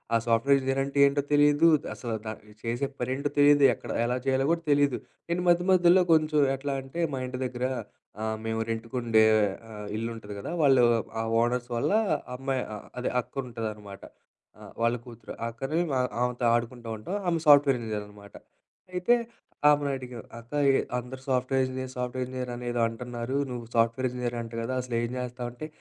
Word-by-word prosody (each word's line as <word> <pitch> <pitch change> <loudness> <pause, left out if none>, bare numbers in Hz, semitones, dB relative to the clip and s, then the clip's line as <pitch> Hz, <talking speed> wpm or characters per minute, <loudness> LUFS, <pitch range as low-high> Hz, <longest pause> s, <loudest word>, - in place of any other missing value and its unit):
ఆ - - +6
software 120 +4 +4
engineer 135 +1 0
అంటే 140 +1 -5
ఏంటో 140 +1 +2
తెలీదు, 145 +2 +5 0.3
అసలు 115 -3 -4
త - - -6 0.3
జేసే 120 +4 -1
పనేంటో 130 +4 -1
తెలీదు, 145 0 +6
ఎక్కడ - - -8
ఎలా 125 +1 0
చేయాలో 135 0 +2
గూడా 170 0 0
తెలీదు. 145 -2 +3 0.3
నేను 175 +1 0
మధ్యమధ్యలో 180 +1 +5
కొంచెం 155 -1 +3 0.2
ఎట్లా 140 +1 -3
అంటే, 135 +6 -8
మా 135 - -2
ఇంటి 125 0 -5
దగ్గర 125 0 -3 0.6
ఆహ్, 110 0 -2
మేము 110 0 -1
రెంట్‌కుండే 115 -1 +2 0.5
ఆహ్, 105 -1 -7
ఇల్లుంటది 115 -2 -5
గదా! 160 - -5
వాళ్ళు 135 -4 +6 0.4
ఆ - - -1 0.2
ఓనర్స్ 120 +1 0
వల్ల 115 - 0 0.5
అమ్మాయి 135 -1 -1 0.4
అదే 125 - -1
అక్క - - -24
ఉంటదనమాట. 105 -4 -6 0.6
ఆ! - - -13 0.2
వాళ్ళ 115 +1 +3
కూతురు. 120 -2 -10 0.2
అక్కని 135 +7 -3
వ - - -1 0.3
ఆమెతో 125 0 0
ఆడుకుంటూ 120 0 -3
ఉంటాం. 110 - -5
ఆమె 170 -1 +1
సాఫ్ట్‌వేర్ 145 -2 +7
ఇంజనీరనమాట. 105 -2 -7 0.6
అయితే 180 +7 +3 0.6
ఆమెనడిగాం 135 -5 -1 0.2
"అక్క 115 +3 -15 0.5
అందరూ 125 +2 -7
సాఫ్ట్‌వేర్ 130 0 +1
ఇంజనీర్, 130 0 -4
సాఫ్ట్‌వేర్ 125 +1 -2
ఇంజినీర్ 130 -1 -5
అని 120 0 -7
ఏదో 120 0 -1
అంటున్నారు. 120 +2 -5
నువ్వు 120 -2 -6
సాఫ్ట్‌వేర్ 115 +2 +2
ఇంజనీర్ 125 -1 -3
అంట 115 0 -7
గదా! 115 +3 -2
అసలేం 120 -2 -1
జేస్తావు?" 125 -1 -4
అంటే 140 +6 -7
125 Hz, 160 wpm, -27 LUFS, 115-140 Hz, 0.6 s, సాఫ్ట్‌వేర్